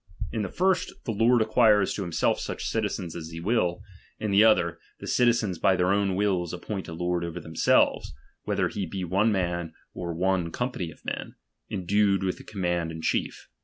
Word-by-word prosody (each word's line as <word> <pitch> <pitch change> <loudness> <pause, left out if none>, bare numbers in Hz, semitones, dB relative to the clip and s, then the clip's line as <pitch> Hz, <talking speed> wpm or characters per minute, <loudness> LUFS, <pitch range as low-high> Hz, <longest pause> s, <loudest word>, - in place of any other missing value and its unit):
In 110 - -2
the 100 - -3
first, 185 0 +1
the 120 - -1
lord 115 +3 +3
■ - - +5
acquires 110 -3 +4
to - - -4
himself 85 -4 0
such - - -4
citizens 100 -6 -2
as 80 -2 -6
he 80 0 -7
will; 90 -2 0 0.4
in 105 - -2
the 100 - +5
c"". - - +8
n«ii.™i 110 -1 +7
otlier, 85 -1 -2 0.2
the - - -8
citizens 115 -7 +2
by 95 - +4
their 90 +1 +2
own 100 -2 +1
wills 95 -4 0
appoint 95 +2 -5
a 80 - -6
lord 90 +1 -1
Son. 85 - -3
'" - - -13
0"ver 90 - -5
themselves, 80 -5 +2 0.3
whether - - 0
he 100 -3 -4
be 95 +2 -4
one 100 +6 +2
man 85 -4 -1 0.2
or 85 -1 -4
one 90 -1 +1
company 125 -8 -3
of 80 - -16
men, - - -4 0.3
endued 100 +1 +1
with 95 -1 -2
the - - -11
command 85 -5 -2
in 80 0 -7
etiief. - - -1
95 Hz, 210 wpm, -27 LUFS, 85-105 Hz, 0.4 s, c